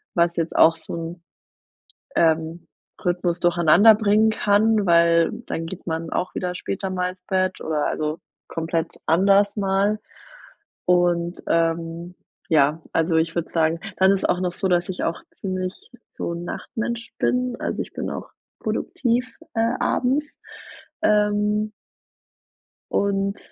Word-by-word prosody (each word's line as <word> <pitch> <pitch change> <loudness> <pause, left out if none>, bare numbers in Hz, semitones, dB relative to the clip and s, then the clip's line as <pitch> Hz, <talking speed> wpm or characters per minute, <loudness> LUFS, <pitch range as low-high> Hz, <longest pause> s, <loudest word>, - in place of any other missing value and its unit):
was 170 0 +2
jetzt 165 0 -2
auch 165 0 +6
so - - -7
'n, 165 +1 -6 0.9
ähm, 160 +1 +1 0.4
Rythmus 175 -1 0
durcheinander 175 +5 +6
bringen 215 +1 +3
kann, 210 0 +2
weil 170 -1 +4 0.2
dann 165 - -3
geht 175 +2 -8
man 165 0 -3
auch 180 - -2
wieder 180 -1 -2
später 195 +1 -4
mal 180 -1 -1
ins 185 0 -15
Bett 185 0 0
oder 155 -2 -1
also 155 +1 -2 0.3
komplett 165 0 -1 0.2
anders 200 +4 +4
mal. 200 +1 +1 0.9
Und, 175 -1 +2
ähm, 165 +1 -1 0.4
ja, 155 +1 +3
also 165 0 +2
ich 165 0 +1
würde 170 -1 -2
sagen 165 0 +2 0.2
dann 190 0 +5
ist 195 - +1
es - - -6
auch 180 - +1
noch 180 -1 -1
so, 190 0 -1
dass 175 -1 +1
ich 185 - -3
auch 165 - -2 0.2
ziemlich 185 -1 -3 0.4
so - - -3
'n 170 0 -5
Nachtmensch 235 +4 -5
bin. 250 0 +1
Also, - - -2
ich - - -12
bin - - -4
auch - - -6 0.3
produktiv, 250 0 -1 0.2
äh, 230 +1 +1
abends. 280 +4 0 0.7
Ähm 210 0 +2 1.2
und 200 0 0
180 Hz, 140 wpm, -23 LUFS, 165-205 Hz, 1.2 s, auch